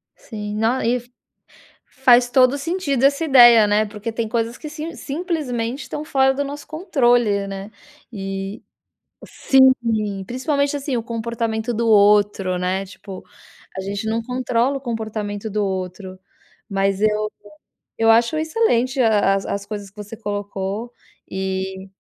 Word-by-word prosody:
Sim, 210 -2 -7
não 225 +4 +1
e 235 +2 +1
f 245 0 -12 0.8
faz 250 -2 +4
todo 255 -1 +5
o - - -3
sentido 285 -4 -1
essa 280 +4 +3
ideia, 240 -6 +7
né, 210 +1 +2
porque 210 +2 -6
tem 225 -1 -2
coisas 230 +1 -2
que 305 - -7
sim 315 +2 -6
simplesmente 280 -6 -3
estão 295 - -6
fora 265 -2 +3
do 285 +1 -1
nosso 285 +1 -7
controle, 245 - +1
né, 195 +1 -7 0.4
e, 195 +1 -5 0.6
sim. 265 -1 +4 0.5
Principalmente 280 - -1
assim, 275 -2 -3
o 230 - -2
comportamento 230 0 -3
do 230 0 -1
outro, 205 -3 +4
né, 185 +2 -1
tipo, 195 0 -11 0.5
a - - -2
gente 200 +2 -4
não 225 +1 -1
controla 250 +2 0
o - - -5
comportamento 220 -3 -4
do 210 0 0
outro, 185 0 -5 0.5
mas 195 -1 0
eu 215 0 +1 0.7
eu 225 0 +4
acho 235 +7 +4
excelente 310 - +1
a 210 -4 +3
as 195 - -2
as 200 0 -4
coisas 205 -2 -7
que 195 - -41
você 210 +2 -8
colocou 205 +1 -4 0.4
e, 190 0 -4
225 Hz, 145 wpm, -21 LUFS, 205-260 Hz, 0.8 s, ideia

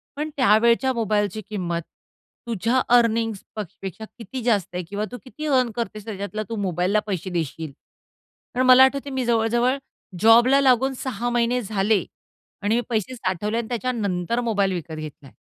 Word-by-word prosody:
पण 300 +2 -3
त्यावेळच्या 235 +2 +4
मोबाईलची 215 -3 0
किंमत 175 -5 -2 0.7
तुझ्या 230 +3 +1 0.2
अर्निंग्जपेक्षा 220 -4 -2
किती 250 +2 -7
जास्त 215 -6 +2
आहे 180 - -2
किंवा 205 +1 -2
तू 245 - -6
किती 305 +4 -8
अर्न 255 -4 +3
करतेस 215 -3 -4
त्याच्यातला, 210 0 -4
तू 230 - -3
मोबाईलला 185 +2 +1
पैसे 190 -2 -3
देशील. 160 -3 -3 0.8
कारण 255 +1 +1
मला 255 +1 +9
आठवतंय 275 +1 +1
मी 260 -1 -1
जवळ-जवळ 235 +3 +2 0.4
जॉबला 235 +5 +6
लागून 265 0 +3
6 245 -2 -2
महिने 240 +1 +1
झाले 205 -1 +1 0.6
आणि 210 +2 +1
मी 240 - +2
पैसे 230 +2 -1
साठवले 210 0 -2
आणि 235 -1 -2
त्याच्यानंतर 230 -4 -1
मोबाईल 200 -5 +1
विकत 170 -2 -5
घेतलाय. 150 -3 -9
225 Hz, 145 wpm, -23 LUFS, 195-245 Hz, 0.8 s, मला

